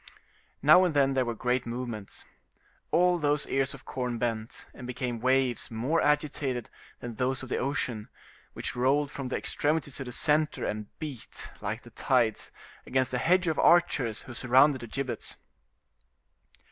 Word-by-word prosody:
Now 155 +6 +8
and 175 -5 0
then 135 -1 +4
there 130 -1 +1
were 120 -1 -3
great 125 +1 0
movements. 115 -4 -6 0.6
All 175 +2 +3
those 145 -1 +1
ears 135 0 0
of 130 - -15
corn 125 -2 -3
bent, 115 -1 -3
and 125 - -9
became 125 -1 -3
waves 130 -1 +1
more 130 +9 0
agitated 145 -4 0 0.3
than 120 -3 -6
those 130 +2 -1
of 130 - -8
the - - 0
ocean, 125 -5 -2 0.4
which - - -4
rolled 140 +3 +2
from 135 -2 -5
the 125 - -2
extremities 145 -2 0
to - - -3
the 125 - -7
center, 150 +4 +2
and 105 0 -3
beat, 145 -7 -7
like - - -4
the - - -14
tides, 120 -4 +1 0.3
against 130 -1 0
the 125 - 0
hedge 180 +5 +3
of 160 -2 0
archers 150 -10 +3
who 130 - -9
surrounded 130 +2 +4
the 120 - -7
gibbets. 135 +2 -3
130 Hz, 160 wpm, -28 LUFS, 120-145 Hz, 0.6 s, Now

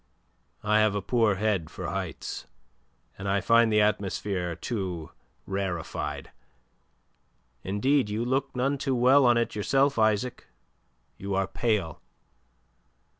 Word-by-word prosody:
"I 105 +1 +3
have 110 -1 +3
a 100 - -1
poor 115 -3 +2
head 95 -5 0
for 90 +1 -7
heights, 95 -4 -5 0.7
and 95 0 -3
I 100 +1 +2
find 115 +1 +4
the 105 0 +4
atmosphere 95 -4 -1
too 90 - -4 0.3
rarefied. 95 -4 -4 1.3
Indeed, 120 +6 +1
you 110 +3 -2
look 135 +2 -1
none 135 +3 0
too 135 -2 0
well 130 +2 +5
on 120 -1 +5
it 115 - 0
yourself, 135 +5 +1
Isaac. 110 +3 +1 0.7
You 100 0 -3
are 95 0 +1
pale." 100 -6 -1
105 Hz, 125 wpm, -27 LUFS, 95-120 Hz, 1.3 s, well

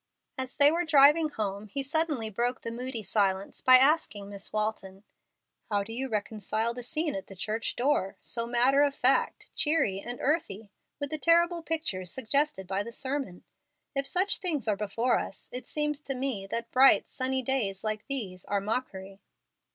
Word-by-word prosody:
As 260 -1 -5
they 285 +1 +6
were 340 +2 0
driving 305 0 +6
home, 205 -5 -4
he 275 +7 -3
suddenly 290 -6 -1
broke 240 +4 -1
the 230 - -5
moody 240 -1 -5
silence 195 -1 0
by 255 0 +8
asking 255 -8 +2
Miss 200 0 -8
Walton, 210 -2 -3 0.7
"How 205 -2 +1
do 225 +3 -8
you 265 +3 -3
reconcile 215 +1 -1
the 245 - -7
scene 305 +5 -1
at 290 0 -6
the 195 - -11
church 215 +4 -3
door, 245 -7 0
so 230 0 -3
matter 250 +4 +3
of 285 -1 +2
fact, 260 0 +1
cheery, 295 -11 +1
and 240 +4 -6
earthly, 225 - -1 0.3
with 285 -1 -4
the 310 - -1
terrible 340 +2 +3
pictures 310 - -2
suggested 270 -4 0
by 195 +2 -1
the 235 - -6
sermon? 260 -8 -4 0.5
If 275 -1 +1
such 375 +3 +1
things 310 - -1
are 210 - +2
before 215 +5 0
us, - - -5
it 250 - -6
seems 295 -1 -1
to 275 -3 -4
me 250 -7 -3
that 230 +3 -4
bright, 265 +1 +6
sunny 260 0 -2
days 225 -7 -1
like 215 -1 -3
these 205 -10 -3
are 200 - 0
mockery." 195 -3 -4
245 Hz, 175 wpm, -28 LUFS, 205-285 Hz, 0.7 s, by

